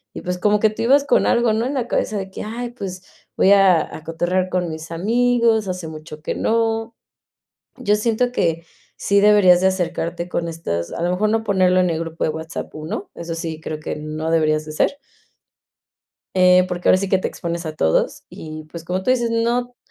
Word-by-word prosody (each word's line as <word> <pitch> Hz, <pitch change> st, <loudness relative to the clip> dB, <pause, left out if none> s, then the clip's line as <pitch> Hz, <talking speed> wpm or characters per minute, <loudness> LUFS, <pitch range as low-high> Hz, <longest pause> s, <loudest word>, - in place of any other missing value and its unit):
y, -, -, -6 dB
pues, 180 Hz, 0 st, -3 dB
como 210 Hz, +3 st, +2 dB
que 220 Hz, -, +4 dB
tú 215 Hz, +2 st, -5 dB
ibas 275 Hz, +4 st, +4 dB
con -, -, +3 dB
algo, 235 Hz, -2 st, +3 dB
¿no? 225 Hz, +2 st, 0 dB
En 270 Hz, -, -2 dB
la 245 Hz, -3 st, -1 dB
cabeza 215 Hz, -, -1 dB
de 190 Hz, -1 st, -4 dB
que, -, -, -7 dB
"ay, 235 Hz, +3 st, -5 dB
pues, 190 Hz, -6 st, -7 dB, 0.3 s
voy 195 Hz, -, +5 dB
a 195 Hz, -4 st, +6 dB, 0.2 s
a 155 Hz, -, -10 dB
cotorrear 175 Hz, +3 st, -1 dB
con 180 Hz, -1 st, -1 dB
mis 160 Hz, 0 st, -7 dB
amigos, 230 Hz, +3 st, +2 dB
hace 180 Hz, -3 st, -4 dB
mucho 155 Hz, -1 st, -9 dB
que -, -, -2 dB
no" 225 Hz, 0 st, 0 dB, 0.8 s
Yo 205 Hz, -, +2 dB
siento 230 Hz, +3 st, 0 dB
que 165 Hz, -7 st, 0 dB, 0.3 s
sí 200 Hz, 0 st, +2 dB
deberías 205 Hz, -4 st, +6 dB
de 190 Hz, -, +4 dB
acercarte 175 Hz, -1 st, -2 dB
con 170 Hz, -, -2 dB
estas 85 Hz, -, -4 dB
a -, -, -5 dB
lo 175 Hz, -, +1 dB
mejor 210 Hz, +4 st, +1 dB
no 225 Hz, 0 st, +1 dB
ponerlo 185 Hz, -3 st, +3 dB
en 180 Hz, -, +2 dB
el 160 Hz, -, -2 dB
grupo 165 Hz, 0 st, -4 dB
de -, -, +1 dB
WhatsApp, 160 Hz, +1 st, -6 dB
1 155 Hz, +6 st, -5 dB
eso 170 Hz, 0 st, -5 dB
sí 165 Hz, -1 st, -5 dB
creo 155 Hz, -1 st, -5 dB
que -, -, -5 dB
no 155 Hz, +1 st, -4 dB
deberías 155 Hz, -1 st, +2 dB
de 155 Hz, -, -7 dB
hacer. 155 Hz, -, 0 dB, 1.4 s
Eh, 180 Hz, 0 st, +5 dB
porque 180 Hz, -1 st, -1 dB
ahora -, -, +6 dB
sí 195 Hz, 0 st, -3 dB
que 190 Hz, -, +3 dB
te -, -, -2 dB
expones 170 Hz, 0 st, -5 dB
a 155 Hz, -, -6 dB
todos 80 Hz, -, +1 dB
y, 155 Hz, 0 st, -9 dB
pues, 170 Hz, -1 st, -8 dB
como 185 Hz, +2 st, -3 dB
tú 255 Hz, -, +2 dB
dices, 240 Hz, -2 st, +1 dB
no 240 Hz, +2 st, 0 dB
185 Hz, 210 wpm, -20 LUFS, 165-220 Hz, 1.4 s, a